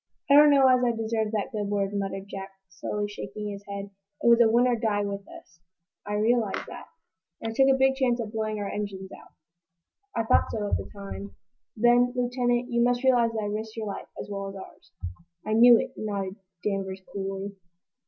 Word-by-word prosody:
"I - - +8
don't 295 +1 +9
know 275 -2 +6
as 255 -1 +4
I 235 -2 +1
deserve 220 -1 -1
that 210 +3 -2
good 210 -3 -3
word," 200 -1 0
muttered 195 -1 -3
Jack, 195 0 -7 0.2
slowly, 205 +2 -3
shaking 205 0 -6
his 200 0 -8
head. 200 0 -6 0.3
"It - - +2
was 235 0 +7
win 235 +2 +5
or 250 -1 +3
die 215 -3 0
with 200 0 -5
us." 165 - -14 0.5
"I 205 - -3
realize 220 0 +1
that." - - -9 0.5
"And 225 - -4
I - - -7
took 270 +3 +4
a 270 0 +4
big 265 0 +4
chance 255 -2 +1
of 220 -2 -4
blowing 215 -1 -2
our 205 -1 -3
engines 195 -2 -5
out." - - -14 0.8
"I 230 - +1
thought 225 - +3
so, 210 -2 -2
at - - +3
the - - -7
time." 200 0 -8 0.4
"Then, 240 +2 +4
Lieutenant, 245 0 0
you 235 0 +2
must 245 +1 +2
realize 245 -3 +4
that 220 -1 -2
I - - -2
risked 215 +2 -4
your 220 - -3
life, 200 - -6
as - - -6
well 195 -1 -4
as 195 - -9
ours." 195 - -12 0.5
"I 215 - -1
knew 235 +1 +8
it," - - -3
nodded 200 -2 -4 0.3
Danvers, 195 -2 -2
coolly. 195 0 -4
215 Hz, 205 wpm, -27 LUFS, 200-240 Hz, 0.8 s, don't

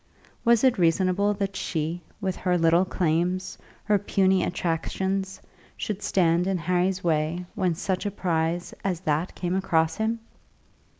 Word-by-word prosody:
Was 235 -1 +4
it 255 -6 +4
reasonable 185 +4 +2
that 195 -1 -3
she 165 +1 -2 0.2
with 190 -3 -2
her 180 -1 +1
little 165 +2 +4
claims, 180 +1 0 0.3
her 210 -2 +2
puny 190 -2 +2
attractions, 190 +3 -2 0.4
should 210 -1 -3
stand 175 -2 +2
in 195 -1 +1
Harry's 180 +2 0
way 165 +1 0
when 180 -3 0
such 190 +4 -2
a - - +1
prize 175 -3 -1
as 185 -3 -1
that 155 +1 -1
came 175 0 -2
across 165 -4 +1
him! 225 +1 0
180 Hz, 140 wpm, -26 LUFS, 170-195 Hz, 0.4 s, Was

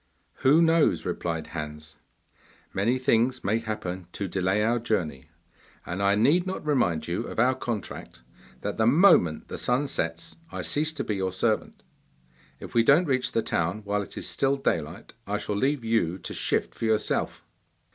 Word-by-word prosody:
'Who 150 +6 +5
knows?' 165 -1 +3
replied 80 -2 -3
Hans. 75 -1 -7 0.8
'Many 115 +7 +1
things 130 -1 +1
may 105 +4 +1
happen 95 -5 -5
to 100 - -3
delay 95 +3 0
our 120 +2 +2
journey, 80 - -2 0.6
and 90 +3 -4
I 100 0 +3
need 150 - +3
not 185 -4 -4
remind 90 - +1
you 85 +1 -2
of - - -8
our 125 +3 +4
contract 115 - -6 0.4
that 105 - -3
the 110 - +3
moment 135 - +5
the - - -6
sun 125 +4 +1
sets 85 -8 -4
I - - -4
cease 155 +2 0
to 145 - -3
be 105 - -2
your 95 -1 -1
servant. 110 +4 -1 0.8
If - - -9
we 115 - +5
don't 140 +9 +5
reach 130 -4 0
the 115 - +1
town 90 +6 -1
while 100 0 -1
it 100 - -9
is - - -3
still 135 0 +1
daylight 85 - -2
I 105 +1 -1
shall 105 0 -3
leave 135 +4 0
you 110 -6 +1
to - - -7
shift - - -1
for - - -4
yourself. 110 -1 0
110 Hz, 175 wpm, -26 LUFS, 90-130 Hz, 0.8 s, Who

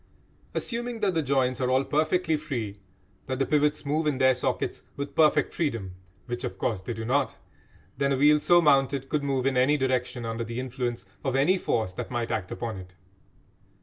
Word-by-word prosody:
Assuming 240 -1 -3
that 200 -3 +2
the 165 - +1
joints 130 -3 +1
are 125 - +1
all 130 +1 +3
perfectly 160 +3 +1
free, 125 -10 -4 0.5
that 130 -1 -2
the 135 - +1
pivots 150 0 +1
move 155 +2 0
in 145 -3 +1
their 130 -1 +5
sockets 125 - -2 0.2
with 140 0 -4
perfect 155 -1 +3
freedom 115 - -2 0.3
which, 120 0 -4
of 125 - -4
course, 105 -5 -1
they 95 - -5
do 110 0 -5
not 135 +3 +1 0.6
then 140 0 +2
a - - +1
wheel 150 +2 +5
so 175 +3 +5
mounted 135 -2 +3
could 150 -2 0
move 135 -2 0
in 135 -1 +2
any 135 +4 +4
direction 125 -2 -1
under 115 +1 -3
the 115 +1 -5
influence 125 -2 -3 0.2
of 135 -1 -1
any 145 +8 +4
force 110 - -1
that - - -5
might 120 -1 -2
act 95 -4 -2
upon 115 -4 -4
it. 90 0 -11
135 Hz, 195 wpm, -27 LUFS, 120-150 Hz, 0.6 s, their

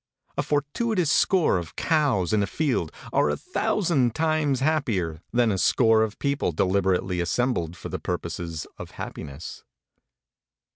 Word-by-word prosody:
A - - +1
fortuitous 165 - 0
score 175 - +3
of 85 -2 -8
cows 140 - +1
in 105 - +3
a 100 - 0
field 120 - -1 0.2
are - - +3
a 75 - -1
thousand 140 - 0
times 155 -4 +1
happier 115 - 0
than 120 -2 +3
a 95 - -1
score 110 0 +4
of 110 -1 -1
people 140 -9 0
deliberately 95 +1 +1
assembled 85 -4 -1
for - - -7
the - - -4
purposes 85 -3 -4
of - - -7
happiness. 70 0 -7
115 Hz, 140 wpm, -25 LUFS, 90-150 Hz, 0.2 s, score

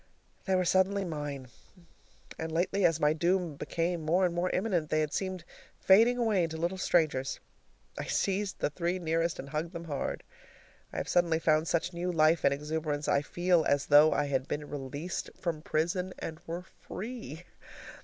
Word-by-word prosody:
They 190 - +2
were 185 -1 +2
suddenly 190 +2 +2
MINE, 145 -5 -5 0.9
and 160 0 -3
lately, 180 +4 +1
as 165 -2 +3
my 150 0 +3
doom 175 +1 +1
became 170 +3 -2
more 170 +4 +2
and 175 - 0
more 175 +1 0
imminent, 180 -6 0
they 155 - +2
had 155 -1 -2
seemed 185 -3 -3 0.4
fading 230 +6 +5
away 220 -7 +2
into 160 -1 -5
little 175 +3 -2
strangers. 155 -7 +1 0.6
I - - -3
seized 195 0 -1
the - - -1
three 175 +3 -1
nearest 165 -1 0
and 140 - -7
hugged 155 +3 -3
them 170 -1 -6
hard. 145 -4 -3 0.7
I - - -7
have - - -2
suddenly 170 -2 +2
found 155 0 +2
such 170 +2 0
new 175 +1 -2
life 160 0 +3
and - - +5
exuberance, 150 0 -2
I 140 - +3
feel 175 +2 +2
as 140 0 +2
though 150 +2 +7
I 145 - +1
had 135 -1 -1
been 150 0 -4
released 145 +5 -5
from 165 -3 -3
prison 175 +4 -1
and 160 -1 -6
were 170 +2 -4
free. 200 -3 -8
165 Hz, 175 wpm, -30 LUFS, 155-180 Hz, 0.9 s, though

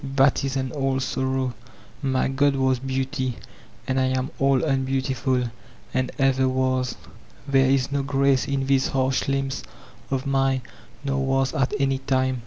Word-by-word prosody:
That 135 0 +4
is 135 0 -2
an 130 -1 -2
old 135 -2 0
sor 130 0 -1
row 130 -1 -1 0.5
I - - 0
My 130 -1 +2
god 140 +1 +2
was 130 -1 +2
Beauty, 130 -1 -2 0.5
and 130 0 +1
I 130 - +3
am 130 +2 -1
all 135 -1 +3
unbeautiful. 130 -3 0 0.4
and 130 0 0
ever 130 -1 +3
was. 130 -1 0 0.5
There 135 -1 +4
is 135 0 +2
no 140 0 +1
grace 135 -1 +2
in 135 -1 -1
these 135 0 +3
harsh 130 0 0
limbs 135 -1 -1 0.5
of 135 0 -1
mine, 135 -1 +1 0.4
nor 135 -1 0
was 135 0 +1
at 135 -1 0
any 135 -1 +1
time. 130 -1 0
135 Hz, 165 wpm, -24 LUFS, 130-135 Hz, 0.5 s, That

